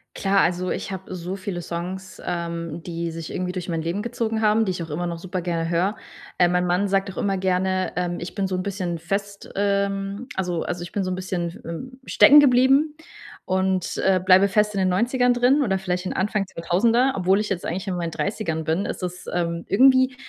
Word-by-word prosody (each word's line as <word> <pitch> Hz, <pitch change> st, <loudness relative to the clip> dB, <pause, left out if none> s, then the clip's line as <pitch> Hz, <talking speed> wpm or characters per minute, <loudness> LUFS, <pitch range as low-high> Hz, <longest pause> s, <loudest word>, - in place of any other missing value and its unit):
Klar, 195 Hz, 0 st, +2 dB
also 180 Hz, +1 st, 0 dB
ich -, -, -4 dB
habe 190 Hz, 0 st, -7 dB
so 180 Hz, +1 st, -4 dB
viele 185 Hz, -2 st, -5 dB
Songs, 180 Hz, +3 st, -6 dB
ähm, 170 Hz, -1 st, -4 dB
die 170 Hz, -1 st, -4 dB
sich 165 Hz, 0 st, -7 dB
irgendwie 180 Hz, 0 st, -2 dB
durch 180 Hz, -1 st, -5 dB
mein 165 Hz, -1 st, -2 dB
Leben 170 Hz, +5 st, -2 dB
gezogen 225 Hz, -1 st, -2 dB
haben, 215 Hz, +1 st, +3 dB
die 190 Hz, -, 0 dB
ich 180 Hz, -, -4 dB
auch 165 Hz, -, -6 dB
immer 170 Hz, +4 st, -3 dB
noch 170 Hz, -1 st, -4 dB
super 185 Hz, +1 st, -4 dB
gerne 165 Hz, -1 st, -2 dB
höre. 180 Hz, +5 st, +1 dB, 0.4 s
Äh, 180 Hz, -, +6 dB
mein 180 Hz, 0 st, +1 dB
Mann 180 Hz, +3 st, +1 dB
sagt 195 Hz, 0 st, 0 dB
auch -, -, -14 dB
immer 195 Hz, -1 st, 0 dB
gerne, 185 Hz, 0 st, 0 dB
ähm, 175 Hz, -1 st, -1 dB
ich 175 Hz, +1 st, -6 dB
bin 195 Hz, -2 st, -1 dB
so 185 Hz, -, -2 dB
'n 185 Hz, -, -2 dB
bisschen 185 Hz, -3 st, -3 dB
fest 200 Hz, +4 st, -4 dB
ähm, 200 Hz, +2 st, -1 dB
also 180 Hz, -3 st, -1 dB
also 175 Hz, 0 st, -4 dB
ich 175 Hz, -, -7 dB
bin 200 Hz, -, -1 dB
so 185 Hz, -, -2 dB
'n -, -, -1 dB
bisschen 185 Hz, -2 st, -3 dB
f 170 Hz, -, -12 dB
ähm, 255 Hz, +11 st, -7 dB
stecken 295 Hz, 0 st, +7 dB
geblieben 270 Hz, +3 st, +4 dB, 0.5 s
und, 190 Hz, -1 st, 0 dB
äh, 190 Hz, -1 st, +4 dB
bleibe 190 Hz, +1 st, +6 dB
fest 210 Hz, +1 st, +2 dB
in 200 Hz, -, -1 dB
den 185 Hz, -1 st, +2 dB
90ern 245 Hz, +6 st, +2 dB
drin 250 Hz, +4 st, +3 dB
oder 195 Hz, -6 st, +1 dB
vielleicht 180 Hz, -1 st, -3 dB
in -, -, -3 dB
Anfang 205 Hz, +1 st, 0 dB
2000er, 230 Hz, +9 st, +2 dB
obwohl 190 Hz, +1 st, +2 dB
ich 210 Hz, -, -2 dB
jetzt 185 Hz, -3 st, -2 dB
eigentlich 185 Hz, +4 st, -3 dB
in 185 Hz, -, -1 dB
meinen 170 Hz, -1 st, -3 dB
30ern 165 Hz, -5 st, -2 dB
bin. 160 Hz, +6 st, 0 dB
Es -, -, -5 dB
ist, 180 Hz, 0 st, -5 dB
ähm, 170 Hz, -1 st, -1 dB
irgendwie 260 Hz, +4 st, +5 dB
185 Hz, 220 wpm, -23 LUFS, 175-205 Hz, 0.5 s, stecken